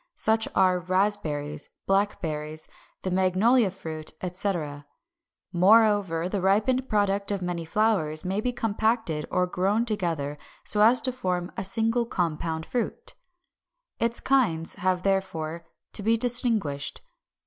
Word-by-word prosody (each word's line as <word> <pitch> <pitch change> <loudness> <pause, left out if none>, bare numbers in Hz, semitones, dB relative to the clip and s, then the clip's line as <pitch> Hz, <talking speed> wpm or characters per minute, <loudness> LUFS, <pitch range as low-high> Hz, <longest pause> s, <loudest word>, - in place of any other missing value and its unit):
Such 220 0 +1
are 185 -1 +4
raspberries, 165 -6 -1 0.2
blackberries, 155 -6 -1 0.4
the 185 - -2
Magnolia 190 +5 +3
fruit, 160 -4 -7
etc. 170 -6 -3 0.7
Moreover, 195 -3 +4
the 195 +1 -2
ripened 220 +7 +2
product 200 -2 +1
of 200 -2 -1
many 175 -1 -3
flowers 160 -5 0
may 195 +3 -1
be 250 - 0
compacted 220 -8 -1
or 180 0 +1
grown 195 +6 0
together 165 -9 -2 0.2
so 210 - +1
as 235 +4 +6
to 255 - -1
form 180 -7 -2
a - - -3
single 225 +4 0
compound 160 -4 -2
fruit. 245 -2 -3 0.9
347. 230 - +2
=Its 235 - -8
kinds= 205 -12 +1
have 185 -1 +1
therefore 170 -4 -2 0.3
to - - +2
be 225 +3 +2
distinguished. 225 - 0
190 Hz, 125 wpm, -26 LUFS, 165-220 Hz, 0.9 s, as